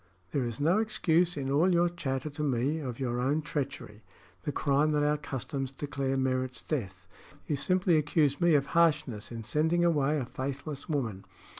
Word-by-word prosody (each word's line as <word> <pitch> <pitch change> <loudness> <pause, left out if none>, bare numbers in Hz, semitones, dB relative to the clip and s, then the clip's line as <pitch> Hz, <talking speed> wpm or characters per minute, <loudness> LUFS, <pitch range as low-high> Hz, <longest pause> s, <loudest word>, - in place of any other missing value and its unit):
there 140 - 0
is 120 -2 -4
no 165 +8 +3
excuse 180 -6 +1
in 135 -1 -2
all 160 +7 +4
your 175 0 +4
chatter 145 -5 -3
to 145 - -6
me 140 +2 0
of 125 -5 -5
your 120 -2 -1
own 135 +5 +1
treachery 140 -8 -4 0.4
the 150 - -3
crime 145 +2 +2
that 150 0 +2
our 150 0 +3
customs 135 -2 -4
declare 135 0 -2
merits 130 -1 -1
death. 95 - -4 0.4
You 150 - 0
simply 180 +3 +2
accuse 150 0 +1
me 170 -2 +5
of 140 -1 +3
harshness 150 -11 +2
in 115 -1 -6
sending 160 +9 +2
away 150 -3 +2
a 135 - -2
faithless 140 +5 -5
woman. 115 -10 -2
145 Hz, 175 wpm, -30 LUFS, 130-160 Hz, 0.4 s, me